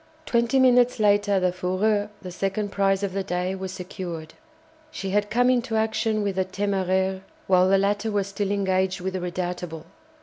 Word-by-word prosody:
Twenty 235 +2 +2
minutes 250 -2 +4
later 205 -1 +3
the 180 -1 +1
"Fougueux," 200 +4 0
the 180 - -6
second 195 +3 -2
prize 195 0 +1
of 195 -2 -2
the 195 0 -1
day, 180 0 -2
was 190 -1 -5
secured. 180 -4 -7 0.6
She 195 -9 -5
had 205 +1 +1
come 245 +3 +3
into 240 -2 0
action 220 -1 0
with 200 -2 -2
the 190 - +2
"Téméraire" 190 -1 0 0.2
while 185 0 +4
the 195 - +5
latter 205 +3 0
was 205 -2 0
still 200 0 -3
engaged 190 -1 0
with 185 +1 -3
the 185 - -2
"Redoutable." 175 -2 -4
195 Hz, 175 wpm, -25 LUFS, 185-205 Hz, 0.6 s, the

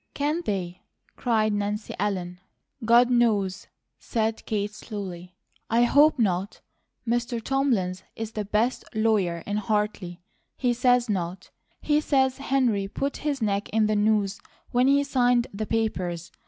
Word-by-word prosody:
"Can 300 +4 0
they?" 180 -3 -3 0.3
cried 220 -3 +1
Nancy 205 +1 -2
Ellen. 180 -3 -2 0.4
"God 240 +2 +5
knows!" 205 -5 +1 0.3
said 225 -1 -2
Kate, 205 -1 -2
slowly. 185 -5 -7 0.3
"I 235 +1 +4
HOPE 290 +5 +5
not. 195 -3 0 0.5
Mr. 235 0 0
Thomlins 225 -8 0
is 225 -1 -5
the 215 -1 -3
best 215 +5 0
lawyer 205 -7 +1
in 205 +1 -2
Hartley; 210 -4 -2 0.4
he 245 -2 +1
says 245 0 +3
not. 185 -2 -3 0.3
He 300 0 +2
says 265 -3 +1
Henry 250 -8 +1
put 275 +7 -3
his 285 -5 -2
neck 200 -1 -1
in 220 0 +2
the 215 0 +1
noose 205 -1 +1 0.3
when 250 +1 +3
he 280 +1 +4
signed 245 -3 +2
the 215 +1 -4
papers. 185 -6 -2
215 Hz, 140 wpm, -25 LUFS, 200-245 Hz, 0.5 s, God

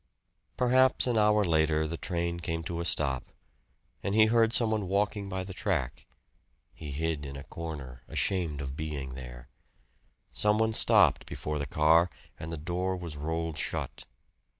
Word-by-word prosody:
Perhaps 130 +1 +4
an 125 -2 +1
hour 105 -1 +4
later 80 -2 +2
the 80 +2 -3
train 85 0 -2
came 80 -1 -3
to 85 +1 -4
a 85 - -2
stop, 70 -5 0 0.7
and 100 - -2
he 110 0 +7
heard 115 0 +3
some 115 -2 +3
one 105 -3 -1
walking 100 +1 0
by 95 -1 -3
the 95 0 -8
track. 90 - -2 0.7
He 75 - -9
hid 80 +1 -2
in 70 -1 -7
a 70 - -7
corner, 70 -8 -7
ashamed 85 -7 -1
of 70 -1 -5
being 70 -4 -4
there. - - -9 0.9
Some 105 0 +2
one 110 0 +2
stopped - - +4
before 75 0 -4
the 70 - -3
car, 80 +5 +4 0.3
and 80 - -6
the 85 - -4
door 90 +4 -2
was 85 -4 -6
rolled 80 +1 -3
shut. - - -4
85 Hz, 165 wpm, -29 LUFS, 75-100 Hz, 0.9 s, he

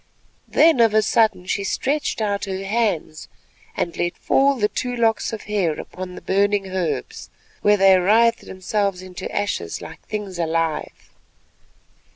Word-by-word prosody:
Then 320 -5 +4
of 225 -2 +4
a 215 - +5
sudden 215 -4 +2
she 200 +2 -1
stretched 280 +4 -1
out 205 -2 -1
her 190 0 -4
hands, 195 -7 -1 0.5
and 170 - -2
let 175 0 -2
fall 275 +1 +3
the 210 -5 +1
two 245 +3 -3
locks 225 -2 +1
of 220 -2 -6
hair 195 -7 -1
upon 180 0 -8
the - - -9
burning 200 +1 +1
herbs, 190 - -3 0.3
where 210 0 +4
they 195 -1 +6
writhed 230 +5 +3
themselves 190 0 -2
to 180 -1 -7
ashes 205 - -2
like 160 -1 -10
things 205 -4 -5
alive. 165 -1 -2
200 Hz, 150 wpm, -22 LUFS, 180-220 Hz, 0.5 s, they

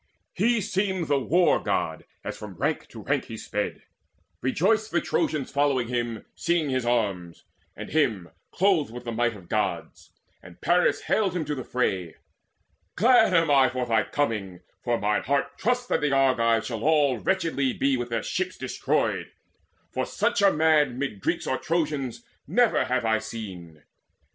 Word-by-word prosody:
He 235 -1 +2
seemed 190 -3 -1
the 145 -1 +2
War 175 +7 +3
god, - - -2 0.2
as - - -5
from - - -9
rank - - -1
to - - -11
rank - - 0
He - - -8
sped; - - -4 0.6
rejoiced 215 - +1
the 175 - +1
Trojans 155 -5 -1
following 140 -4 +1
him, 120 -3 -3
Seeing 165 -5 0
his 130 -2 -1
arms, 100 -8 -1 0.3
and - - -8
him 110 - 0 0.2
clothed 180 - +2
with 120 +1 -8
the 120 - -4
might 120 0 0
Of 95 -4 -13
Gods; - - -3 0.3
and 90 -1 -14
Paris 175 +1 +2
hailed 195 -5 0
him 165 -3 -1
to 150 - -2
the 130 -3 -5
fray: 95 -10 -1 0.8
"Glad 230 +1 +5
am 165 -3 +3
I 135 -2 +5
for 130 -1 -2
thy 115 -2 +2
coming, 105 -9 -2 0.2
for 120 -1 +1
mine 105 +1 +1
heart 140 +2 0
Trusts 245 +3 +1
that - - +1
the 150 -1 +1
Argives 115 -4 +2
all 140 +3 +2
shall - - -16
wretchedly 165 -8 +1
Be 135 -1 +1
with 120 -1 -3
their 115 -2 -2
ships - - -2
destroyed; - - -1 0.6
for - - -2
such - - 0
a 200 -1 +6
man 150 -5 +3
Mid 135 -7 -3
Greeks - - -1
or 130 - -1
Trojans 145 -8 -2 0.2
never 245 -2 +3
have 125 -2 0
I 110 0 +2
seen. 95 -9 -8
135 Hz, 170 wpm, -26 LUFS, 115-165 Hz, 0.8 s, a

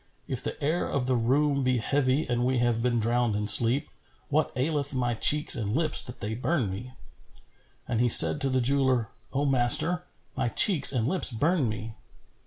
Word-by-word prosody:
If 130 -2 -4
the - - -6
air 160 +5 -2
of 130 -3 -3
the 130 0 -1
room 140 +4 0
be 130 -1 0
heavy 135 +4 -1
and 120 0 -2
we 130 +1 -1
have 120 -1 -1
been 120 0 -1
drowned 120 0 -1
in 105 0 -3
sleep, 120 +5 +4 0.4
what 150 +2 -1
aileth 140 +1 -2
my 120 -2 -2
cheeks 150 +6 +2
and 105 -1 -4
lips 155 -1 0
that 125 - -10
they 105 +2 -5
burn 125 - -2
me?" 120 +7 -9 0.9
And 115 - -3
he 120 - +1
said 145 - +6
to 135 - -1
the 130 -1 -1
jeweller, 130 -3 0 0.2
"O 140 +1 -2
master, 135 +7 +2 0.3
my - - -2
cheeks 165 - +6
and 120 -4 -2
lips 180 -2 -1
burn 145 +2 -1
me." 110 +1 -7
130 Hz, 190 wpm, -25 LUFS, 120-145 Hz, 0.9 s, said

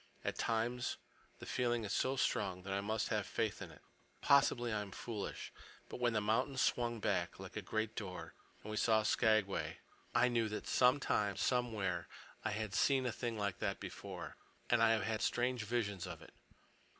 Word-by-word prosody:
At - - -1
times 120 +3 0 0.4
the - - -9
feeling 120 -2 0
is 100 - -2
so 130 +1 +1
strong 95 -8 0
that 95 0 -3
I 100 - 0
must 110 +2 -1
have 105 -3 0
faith 110 -3 -1
in - - -6
it. - - -16 0.4
Possibly 120 -4 +4
I 105 - 0
am 100 - -6
foolish. 105 +1 -5 0.4
But - - -6
when 120 -1 +2
the 110 - +2
mountain 125 +6 +1
swung 120 -2 +1
back, - - 0
like - - -9
a - - -2
great 110 0 -2
door, 95 -5 -6 0.3
and 110 - -6
we 105 - -3
saw 110 -1 +4
Skagway, 110 -3 +2 0.4
I 120 +1 +6
knew 115 -3 +1
that 105 - -4
sometime—somewhere—I 110 -6 +1
had 105 -1 -3
seen 135 +3 +3
a 125 - +1
thing 115 -1 -3
like 100 -3 -2
that - - -1
before. - - -7 0.3
And 120 -1 +5
I 115 - +6
have 110 - +1
had 110 -1 -1
strange 125 -2 +1
visions 100 -5 -1
of - - -7
it. - - -15
110 Hz, 180 wpm, -36 LUFS, 105-120 Hz, 0.4 s, I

